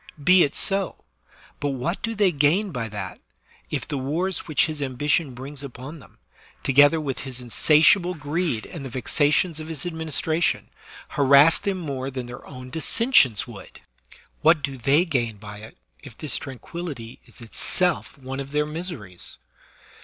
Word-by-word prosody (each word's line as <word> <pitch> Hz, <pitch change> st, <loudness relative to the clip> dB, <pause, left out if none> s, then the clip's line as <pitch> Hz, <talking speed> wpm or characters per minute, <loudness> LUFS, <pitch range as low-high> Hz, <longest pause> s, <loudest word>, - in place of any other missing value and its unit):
Be 185 Hz, +2 st, +6 dB
it 145 Hz, -, -1 dB
so; 195 Hz, -2 st, +1 dB, 0.6 s
but 145 Hz, -1 st, -1 dB
what 160 Hz, +8 st, -3 dB
do 225 Hz, +1 st, -2 dB
they 200 Hz, -3 st, +3 dB
gain 170 Hz, +7 st, +2 dB
by 115 Hz, -6 st, -4 dB
that, 95 Hz, -3 st, -6 dB, 0.5 s
if -, -, -3 dB
the 145 Hz, -3 st, -3 dB
wars 170 Hz, +8 st, -2 dB
which 155 Hz, -, +3 dB
his 155 Hz, -2 st, -4 dB
ambition 140 Hz, +1 st, 0 dB
brings 135 Hz, +3 st, -7 dB
upon 140 Hz, +3 st, -9 dB
them, -, -, -18 dB, 0.5 s
together 145 Hz, +4 st, +5 dB
with 140 Hz, -4 st, -4 dB
his 130 Hz, -2 st, -5 dB
insatiable 155 Hz, -, +4 dB
greed 150 Hz, -5 st, -2 dB
and 160 Hz, -5 st, -8 dB
the 135 Hz, -, -6 dB
vexations 145 Hz, +6 st, +1 dB
of 155 Hz, -, -7 dB
his 160 Hz, -2 st, -4 dB
ad 175 Hz, -, -3 dB
ministration, 160 Hz, +1 st, -1 dB, 0.4 s
harass 140 Hz, +3 st, +5 dB
them 200 Hz, -2 st, -2 dB
more 135 Hz, -6 st, -4 dB
than 130 Hz, -2 st, -5 dB
their 125 Hz, +1 st, -9 dB
own 130 Hz, -2 st, -10 dB
dissen 230 Hz, -, -1 dB
sions 120 Hz, -, +5 dB
would? -, -, -12 dB, 0.6 s
What 160 Hz, -1 st, +4 dB
do 140 Hz, -1 st, -3 dB
they 140 Hz, +7 st, +3 dB
gain 120 Hz, -, -1 dB
by 105 Hz, 0 st, -10 dB
it 110 Hz, +2 st, -12 dB, 0.2 s
if 115 Hz, -, -13 dB
this 150 Hz, -6 st, 0 dB
tranquillity 135 Hz, -2 st, -7 dB
is -, -, -16 dB
itself 170 Hz, -, +2 dB
one 135 Hz, 0 st, -6 dB
of 135 Hz, 0 st, -5 dB
their 150 Hz, 0 st, +2 dB
miseries 150 Hz, -, -7 dB
145 Hz, 165 wpm, -24 LUFS, 130-165 Hz, 0.6 s, Be